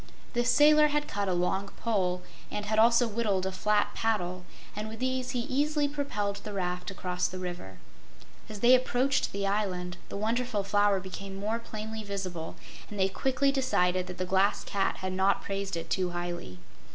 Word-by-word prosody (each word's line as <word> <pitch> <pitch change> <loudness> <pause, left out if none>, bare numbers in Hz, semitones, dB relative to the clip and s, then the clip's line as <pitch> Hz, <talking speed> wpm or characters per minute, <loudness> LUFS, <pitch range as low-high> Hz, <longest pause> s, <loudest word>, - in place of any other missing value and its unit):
The 240 -1 +2
sailor 300 +4 +6
had 295 0 0
cut 200 -5 -2
a - - +2
long 185 +3 0
pole, 185 -5 0 0.3
and 210 0 -4
had 215 +1 +1
also 235 +2 +6
whittled 205 -4 0
a 190 - -1
flat 205 +2 +1
paddle, 185 -5 -1 0.3
and 215 +1 -4
with 220 - -7
these 255 0 -1
he 250 -1 -1
easily 290 +3 +1
propelled 245 -9 -2
the 210 +1 -7
raft 180 -1 -2
across 180 -1 -1
the 185 - -7
river. 175 - -6 0.7
As 210 -2 -7
they 245 +1 +7
approached 255 +1 +2
the 200 0 -2
island, 185 -3 -1
the - - -4
Wonderful 225 0 0
Flower 205 0 +3
became 195 +1 -7
more 215 +4 -1
plainly 220 -1 -6
visible, 185 -5 -4 0.3
and 205 - -6
they 190 0 +3
quickly 265 +6 +1
decided 185 -9 +1
that 180 - -7
the 185 - -1
Glass 190 +2 +2
Cat 195 -1 0
had 185 0 -2
not 190 +1 +2
praised 195 -2 -3
it 165 - -6
too 185 -2 +1
highly. 175 - -5
200 Hz, 180 wpm, -29 LUFS, 185-235 Hz, 0.7 s, they